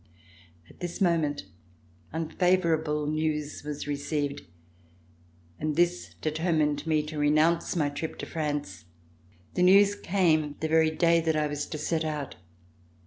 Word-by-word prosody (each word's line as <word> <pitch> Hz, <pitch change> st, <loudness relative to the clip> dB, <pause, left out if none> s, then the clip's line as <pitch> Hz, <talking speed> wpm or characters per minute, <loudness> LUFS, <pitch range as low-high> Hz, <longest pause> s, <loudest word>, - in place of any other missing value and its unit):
At -, -, -19 dB
this 175 Hz, -1 st, -5 dB
moment 160 Hz, -, +1 dB, 0.7 s
un 160 Hz, +1 st, -3 dB
favorable 160 Hz, -4 st, +1 dB
news 150 Hz, -1 st, -2 dB
was 150 Hz, -1 st, -5 dB
received, 145 Hz, 0 st, -2 dB, 1.2 s
and 155 Hz, 0 st, -1 dB
this 175 Hz, +2 st, 0 dB
determined 155 Hz, -1 st, 0 dB
me 155 Hz, -1 st, +2 dB
to 150 Hz, 0 st, -6 dB
renounce 155 Hz, +4 st, +2 dB
my 150 Hz, -4 st, +1 dB
trip 150 Hz, +3 st, -5 dB
to -, -, -5 dB
France. 145 Hz, -, -4 dB, 0.7 s
The -, -, -1 dB
news 200 Hz, +3 st, +6 dB
came 165 Hz, -7 st, +1 dB
the 160 Hz, -, -1 dB
very 160 Hz, 0 st, +4 dB
day 170 Hz, +1 st, +3 dB
that 160 Hz, -1 st, 0 dB
I 155 Hz, 0 st, +1 dB
was 145 Hz, 0 st, -3 dB
to 155 Hz, -, -5 dB
set 160 Hz, +2 st, -1 dB
out. 150 Hz, -3 st, -3 dB
155 Hz, 140 wpm, -28 LUFS, 150-170 Hz, 1.2 s, news